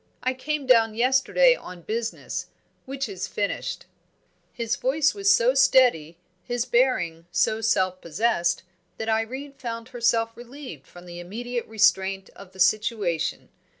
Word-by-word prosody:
I 255 Hz, -, +1 dB
came 290 Hz, +2 st, -3 dB
down 225 Hz, -4 st, +4 dB
yesterday 265 Hz, -, +4 dB
on 180 Hz, -, -11 dB
business 225 Hz, +3 st, -4 dB, 0.4 s
which 270 Hz, -1 st, -4 dB
is 190 Hz, -2 st, -5 dB
finished." 200 Hz, 0 st, -3 dB, 0.7 s
His 235 Hz, -1 st, -2 dB
voice 290 Hz, +3 st, +1 dB
was 400 Hz, 0 st, +2 dB
so -, -, +4 dB
steady, 245 Hz, -, +4 dB, 0.3 s
his 245 Hz, -1 st, -2 dB
bearing 175 Hz, -11 st, +1 dB
so 185 Hz, +5 st, +1 dB
self 185 Hz, -4 st, +1 dB
possessed, 175 Hz, 0 st, 0 dB, 0.3 s
that 220 Hz, -, -3 dB
Irene 255 Hz, +6 st, -2 dB
found 230 Hz, -3 st, -6 dB
herself 230 Hz, -2 st, +1 dB
relieved 240 Hz, -, -10 dB
from 175 Hz, 0 st, -14 dB
the 175 Hz, 0 st, -9 dB
immediate 235 Hz, +7 st, -5 dB
restraint 195 Hz, -3 st, +1 dB
of 195 Hz, -2 st, -13 dB
the 190 Hz, -, -16 dB
situation. 205 Hz, -4 st, 0 dB
230 Hz, 135 wpm, -25 LUFS, 190-255 Hz, 0.7 s, down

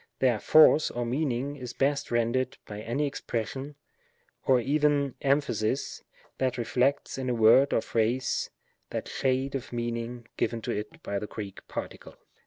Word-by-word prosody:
Their 125 Hz, -5 st, +2 dB
force 155 Hz, +3 st, +6 dB
or 120 Hz, 0 st, -3 dB
meaning 135 Hz, +1 st, -1 dB
is 125 Hz, -2 st, -7 dB
best 140 Hz, +1 st, 0 dB
rendered 125 Hz, +3 st, 0 dB
by 105 Hz, 0 st, -7 dB
any 120 Hz, +7 st, -1 dB
expression, 135 Hz, +1 st, -4 dB, 0.7 s
or 130 Hz, -2 st, +5 dB
even 145 Hz, +1 st, +2 dB
emphasis, 135 Hz, -3 st, 0 dB, 0.4 s
that 130 Hz, -1 st, 0 dB
reflects 125 Hz, +3 st, 0 dB
in 130 Hz, -1 st, -2 dB
a 125 Hz, -, +1 dB
word 115 Hz, +5 st, +6 dB
or -, -, +2 dB
phrase, 120 Hz, +4 st, 0 dB, 0.4 s
that -, -, -4 dB
shade 130 Hz, +1 st, 0 dB
of 135 Hz, -3 st, -4 dB
meaning 120 Hz, 0 st, -4 dB
given 115 Hz, -, 0 dB
to -, -, -2 dB
it 105 Hz, +1 st, -5 dB
by 100 Hz, -, -2 dB
the 105 Hz, -, -5 dB
Greek 100 Hz, -2 st, -8 dB
particle. -, -, -7 dB
125 Hz, 150 wpm, -28 LUFS, 115-140 Hz, 0.7 s, force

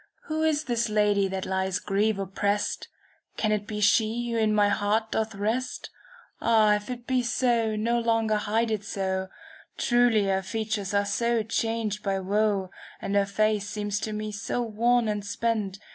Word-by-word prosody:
Who 315 Hz, -1 st, -3 dB
is 310 Hz, -1 st, +2 dB
this 235 Hz, -3 st, -1 dB
lady 205 Hz, -2 st, +2 dB
that 190 Hz, 0 st, -4 dB
lies 190 Hz, -1 st, -1 dB
grief 205 Hz, +1 st, 0 dB
opprest? 200 Hz, +1 st, -1 dB, 0.5 s
Can 215 Hz, -, +1 dB
it 210 Hz, 0 st, -1 dB
be 210 Hz, -1 st, -4 dB
she 225 Hz, +3 st, +2 dB
who 230 Hz, -, 0 dB
in 215 Hz, -1 st, +2 dB
my 210 Hz, -1 st, +4 dB
heart 215 Hz, +2 st, 0 dB
doth 220 Hz, -1 st, -1 dB
rest? 225 Hz, +6 st, -2 dB, 0.5 s
Ah! 220 Hz, -2 st, +4 dB
if 210 Hz, +1 st, -2 dB
it 245 Hz, -1 st, -6 dB
be, 255 Hz, -1 st, +1 dB, 0.5 s
no 235 Hz, +3 st, +1 dB
longer 225 Hz, -2 st, +1 dB
hide 220 Hz, +2 st, 0 dB
it 210 Hz, -2 st, -1 dB
so. 190 Hz, -2 st, -2 dB, 0.5 s
Truly 240 Hz, -3 st, +3 dB
her 190 Hz, 0 st, +1 dB
features 205 Hz, 0 st, -3 dB
are 200 Hz, 0 st, +3 dB
so 235 Hz, +2 st, +1 dB
changed 225 Hz, -1 st, -1 dB
by 195 Hz, -1 st, -1 dB
woe, 200 Hz, -1 st, 0 dB
■* -, -, -21 dB, 0.2 s
And 200 Hz, -, -4 dB
her 200 Hz, -1 st, +3 dB
face 210 Hz, 0 st, +1 dB
seems 205 Hz, -1 st, -2 dB
to 215 Hz, -, -3 dB
me 215 Hz, 0 st, -4 dB
so 225 Hz, +3 st, -2 dB
worn 235 Hz, +1 st, +2 dB
and 210 Hz, -1 st, -2 dB
spent. 205 Hz, -2 st, -1 dB
215 Hz, 175 wpm, -27 LUFS, 200-230 Hz, 0.5 s, my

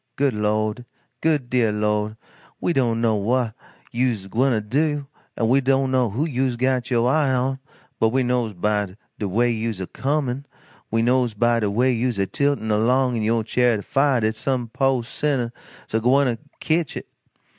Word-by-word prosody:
Good 140 Hz, -2 st, +1 dB
Lord, 105 Hz, +2 st, -1 dB, 0.4 s
good 150 Hz, -6 st, +1 dB
deah 120 Hz, -3 st, +2 dB
Lord, 105 Hz, 0 st, -1 dB, 0.4 s
we 175 Hz, -, 0 dB
don't 120 Hz, -5 st, +1 dB
know 115 Hz, -1 st, +3 dB
whah 115 Hz, +3 st, 0 dB, 0.4 s
you's 120 Hz, -5 st, 0 dB
a -, -, -12 dB
gwyne 115 Hz, -2 st, +1 dB
to, 145 Hz, 0 st, +1 dB, 0.4 s
we 130 Hz, +4 st, +3 dB
don't 135 Hz, 0 st, +2 dB
know 130 Hz, -3 st, +2 dB
who 125 Hz, +10 st, -1 dB
you's 130 Hz, -4 st, 0 dB
got 130 Hz, 0 st, 0 dB
yo' 120 Hz, -2 st, +2 dB
eye 135 Hz, +2 st, +2 dB
on, 130 Hz, +1 st, 0 dB, 0.4 s
but 110 Hz, -, +4 dB
we 130 Hz, +3 st, +1 dB
knows 120 Hz, -3 st, 0 dB
by 105 Hz, 0 st, -1 dB, 0.2 s
de 105 Hz, -, -1 dB
way 120 Hz, +5 st, +2 dB
you's 115 Hz, -3 st, -2 dB
a 95 Hz, -, -3 dB
comin', 140 Hz, +2 st, -2 dB, 0.4 s
we 115 Hz, +1 st, +1 dB
knows 125 Hz, -2 st, +2 dB
by 120 Hz, +2 st, +2 dB
de 105 Hz, -2 st, 0 dB
way 125 Hz, +6 st, +2 dB
you's 120 Hz, -1 st, -1 dB
a 100 Hz, -, +1 dB
tiltin' 140 Hz, -1 st, 0 dB
along 125 Hz, +4 st, +2 dB
in 115 Hz, -, -1 dB
yo' 110 Hz, +1 st, +1 dB
charyot 120 Hz, 0 st, +2 dB
o' -, -, -5 dB
fiah 135 Hz, -3 st, +2 dB
dat 110 Hz, +1 st, 0 dB
some 120 Hz, +1 st, -2 dB
po' 135 Hz, 0 st, +1 dB
sinner's 130 Hz, -1 st, -1 dB, 0.4 s
a 110 Hz, -, +3 dB
gwyne 130 Hz, +5 st, +3 dB
to 120 Hz, -3 st, -1 dB, 0.2 s
ketch 160 Hz, -1 st, 0 dB
it. -, -, -7 dB
120 Hz, 185 wpm, -22 LUFS, 110-130 Hz, 0.4 s, but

